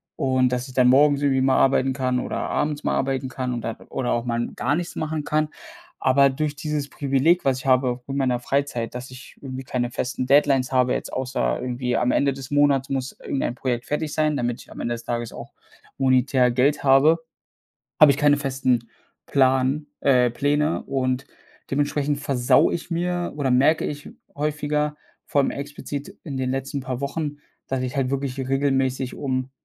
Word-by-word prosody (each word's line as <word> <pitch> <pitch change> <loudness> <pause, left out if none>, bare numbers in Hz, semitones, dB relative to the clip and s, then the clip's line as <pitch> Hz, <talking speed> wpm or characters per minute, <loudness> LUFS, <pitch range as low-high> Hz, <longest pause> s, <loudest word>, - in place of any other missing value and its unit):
und, 130 -3 +1
dass 125 +2 -2
ich - - -11
dann 125 -1 +4
morgens 140 +2 +5
irgendwie 135 -2 +2
mal 130 0 +3
arbeiten 135 0 +3
kann 130 -2 0
oder - - -4
abends 150 0 -1
mal - - +1
arbeiten 135 0 -1
kann 125 -1 -3
und 120 - -3
da 115 0 -4
oder 125 - -1
auch 120 - -1
mal 120 -1 -1
n - - -4
gar 145 - 0
nichts 175 0 -4
machen 155 -1 -3
kann. 155 0 0 0.5
Aber 135 +1 +5
durch 150 +2 -2
dieses 150 -1 -3
Privileg, 140 +5 +2
was 130 -1 +2
ich 130 - -11
habe 125 -1 +2
mit 135 0 -3
meiner 130 -3 +1
Freizeit, 125 -3 -2
dass 125 +1 -7
ich 130 +1 -12
irgendwie 130 -1 -7
keine 125 -2 -2
festen 125 +1 -2
Deadlines 135 -2 +3
habe, 125 -1 +3
jetzt - - -4
außer 125 - -1
irgendwie 125 0 -2
am 125 - +2
Ende 140 -1 +2
des 135 -1 -9
Monats 145 -1 +2
muss 135 -1 -3
irgendein 135 -3 -2
Projekt 125 -1 -2
fertig 150 0 -2
sein, 155 -1 +1
damit 120 -3 -2
ich - - -17
am - - -10
Ende 120 0 -2
des 115 - -10
Tages 120 -1 -3
auch - - -9 0.5
monetär 130 -1 +3
Geld 130 +5 +1
habe, 140 +4 +5 0.8
habe 155 - +9
ich 140 - +2
keine 145 0 +4
festen 130 -4 0 0.4
Plan 130 +2 +2 0.2
äh, 125 -3 +4
Pläne 145 +5 0
und 130 0 -1 0.4
dementsprechend 145 0 0
versaue 135 -4 +3
ich 175 - -5
mir 175 +1 -2
oder 135 -3 0
merke 140 +6 +3
ich 145 -1 -5 0.3
häufiger, 150 0 -1 0.3
vor 140 - +2
allem - - 0
explizit 145 +4 -6
in 140 -6 -5
den 130 -1 -1
letzten 135 +1 -3
paar 130 0 -5
Wochen, 145 +1 -3 0.3
dass 130 -1 -2
ich 130 +1 -4
halt 135 -2 +1
wirklich 135 -1 -2
regelmäßig 135 -1 0
um 130 -1 -2
135 Hz, 190 wpm, -23 LUFS, 125-145 Hz, 0.8 s, habe